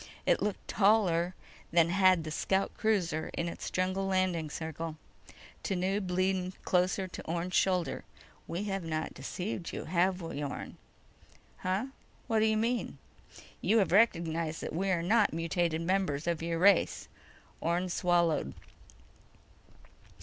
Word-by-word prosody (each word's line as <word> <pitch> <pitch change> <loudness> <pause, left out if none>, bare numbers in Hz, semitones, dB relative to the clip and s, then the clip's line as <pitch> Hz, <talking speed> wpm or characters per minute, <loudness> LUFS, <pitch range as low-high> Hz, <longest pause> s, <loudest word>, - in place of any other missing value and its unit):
It - - +3
looked 210 -2 -2
taller 190 -4 +3 0.4
than 170 0 +4
had 185 -2 +4
the 155 - -5
scout 190 +5 0
cruiser 175 -8 0
in 170 - -1
its 170 - -5
jungle 185 +1 0
landing 185 -4 0
circle. 160 +1 -5 0.7
Tanub 190 0 -1
leaned 185 0 0
close 180 0 +2
to 190 -2 -5
Orne's 170 +2 -3
shoulder. 180 -7 +1 0.4
"We 175 +4 -3
have 195 -2 -2
not 160 -1 -3
deceived 185 -2 -5
you, - - -5
have 180 +2 +1
we, 165 -4 -5
Orne?" 140 - -6 0.8
"Huh? 190 +5 -1 0.4
What 225 -1 +1
do 215 - +4
you 220 0 +2
mean?" 235 +2 -1 0.6
"You 225 - +3
have 195 -6 +3
recognized 165 -6 +2
that - - -5
we 190 +4 -1
are 175 -3 +1
not 210 +1 +3
mutated 165 0 0
members 175 -5 0
of 170 -2 -1
your 165 0 -1
race." 195 +2 +3 0.5
Orne 175 +3 0
swallowed. 170 - +1
180 Hz, 135 wpm, -31 LUFS, 165-195 Hz, 0.8 s, than